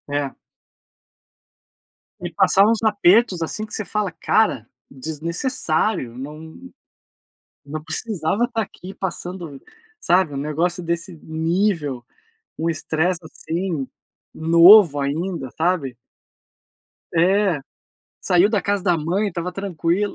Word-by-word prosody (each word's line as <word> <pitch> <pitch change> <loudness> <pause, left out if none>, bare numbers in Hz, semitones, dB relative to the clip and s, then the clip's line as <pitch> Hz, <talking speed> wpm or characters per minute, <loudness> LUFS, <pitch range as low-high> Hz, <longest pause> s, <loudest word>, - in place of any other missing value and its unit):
é. 145 -2 -2 1.8
Me - - -5
passava 195 +2 +4
uns 225 0 +1
apertos, 205 -2 +3
assim, 215 +6 -3
que 215 - -12
você 215 - -3
fala, 210 -1 -2
"Cara, 135 - +1 0.2
desnecessário, 160 - -2
não 155 +4 -8 1.1
não 155 +2 -5
precisava 175 +4 -2
estar 235 -2 -2
aqui 195 -2 -8
passando", 175 -6 -6 0.4
sabe, 180 -4 +2
um - - -4
negócio 160 +5 -1
desse 170 +2 -3
nível, 160 - -1 0.5
um 165 +1 -1
estresse, 165 +3 -1
assim, 165 -2 -4 0.5
novo 170 0 +7
ainda, 150 0 -2
sabe. 160 -7 0 1.2
É, 185 +1 +3 0.6
saiu 180 +3 +3
da 210 -3 +1
casa 200 +1 -1
da 180 -3 +2
mãe, 180 +7 0
estava 180 -1 -4
tranquilo. 195 +1 -1
170 Hz, 105 wpm, -21 LUFS, 155-195 Hz, 1.8 s, novo